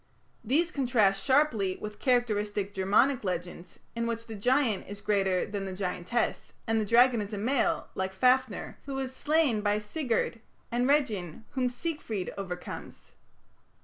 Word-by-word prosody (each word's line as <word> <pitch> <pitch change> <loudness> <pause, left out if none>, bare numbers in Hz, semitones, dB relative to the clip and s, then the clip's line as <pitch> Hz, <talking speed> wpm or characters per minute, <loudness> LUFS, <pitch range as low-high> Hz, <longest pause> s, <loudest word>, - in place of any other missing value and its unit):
These 315 +10 +1
contrast 235 - +2
sharply 255 -9 +2
with 210 0 -7
characteristic 210 -5 0
Germanic 205 +8 +3
legends, 175 -1 -5 0.2
in 230 0 -1
which 230 0 -3
the 225 - -8
giant 235 -1 +1
is 205 0 -7
greater 195 -3 +1
than 200 -1 -4
the 190 - -5
giantess, 185 +4 -2
and 225 -1 +1
the - - -1
dragon 235 +2 +5
is 205 +1 -6
a - - -5
male, 245 +6 +1
like 190 0 -2
Fafner, 255 +6 +1
who 275 -1 -4
is 260 -1 -3
slain 295 -8 +2
by 205 0 +2
Sigurd, 230 0 -2 0.3
and 245 +1 +1
Regin 220 - 0
whom 255 -2 0
Siegfried 245 - -4
overcomes. 180 -3 -7
220 Hz, 145 wpm, -29 LUFS, 195-255 Hz, 0.3 s, dragon